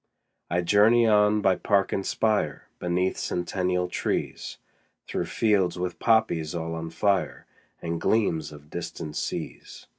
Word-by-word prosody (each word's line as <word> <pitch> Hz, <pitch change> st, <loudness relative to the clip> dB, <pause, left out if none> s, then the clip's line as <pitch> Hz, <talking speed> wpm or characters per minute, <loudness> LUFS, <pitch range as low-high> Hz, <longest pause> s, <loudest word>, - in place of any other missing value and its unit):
20 85 Hz, -, 0 dB
I -, -, -1 dB
journey 110 Hz, +6 st, +5 dB
on 105 Hz, -1 st, +4 dB
by 95 Hz, -2 st, +3 dB
park 100 Hz, +1 st, +1 dB
and 95 Hz, -, -1 dB
spire, 110 Hz, +1 st, 0 dB
Beneath 90 Hz, +1 st, 0 dB
centennial 90 Hz, 0 st, -1 dB
trees, 90 Hz, -, -3 dB, 0.5 s
Through -, -, -2 dB
fields 100 Hz, -6 st, +1 dB
with 90 Hz, -1 st, -4 dB
poppies 110 Hz, -9 st, +2 dB
all 80 Hz, -1 st, -3 dB
on 80 Hz, 0 st, -5 dB
fire, 100 Hz, +4 st, 0 dB, 0.4 s
And 85 Hz, 0 st, -3 dB
gleams 80 Hz, -9 st, +1 dB
of 75 Hz, 0 st, -14 dB
distant 75 Hz, -1 st, -6 dB
seas. -, -, -5 dB
90 Hz, 140 wpm, -26 LUFS, 85-105 Hz, 0.5 s, journey